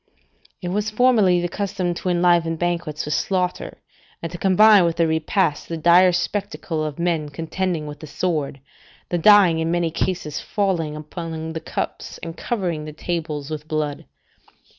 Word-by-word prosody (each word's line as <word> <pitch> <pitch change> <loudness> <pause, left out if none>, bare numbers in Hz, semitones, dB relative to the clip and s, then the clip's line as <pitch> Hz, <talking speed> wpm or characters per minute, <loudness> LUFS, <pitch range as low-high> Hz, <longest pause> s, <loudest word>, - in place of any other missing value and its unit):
["It 175 - -2
was 210 +3 -1
formerly 215 -6 +3
the 175 - -1
custom 190 -1 -2
to 180 - -4
enliven 175 -2 +3
banquets 170 -3 -2
with 150 - -2
slaughter, 180 -2 -1 0.5
and 165 - -4
to 175 - -6
combine 200 +1 +6
with 170 -1 +1
the 170 - +2
repast 160 0 0
the 165 - -3
dire 175 +3 +6
spectacle 185 -4 -2
of 150 -2 -4
men 170 -3 -1
contending 165 +2 -3
with 150 0 -8
the 155 - -9
sword, 150 -4 -2 0.5
the 175 - 0
dying 190 -3 +6
in 160 0 -1
many 170 -1 0
cases 160 -3 -2
falling 175 -7 -1
upon 160 +1 -6
the 160 - -3
cups, 160 - -5
and 165 -1 -6
covering 180 -11 -3
the 155 - -7
tables 155 -3 -4
with 155 0 -5
blood." 155 -2 -2
170 Hz, 160 wpm, -22 LUFS, 155-185 Hz, 0.5 s, combine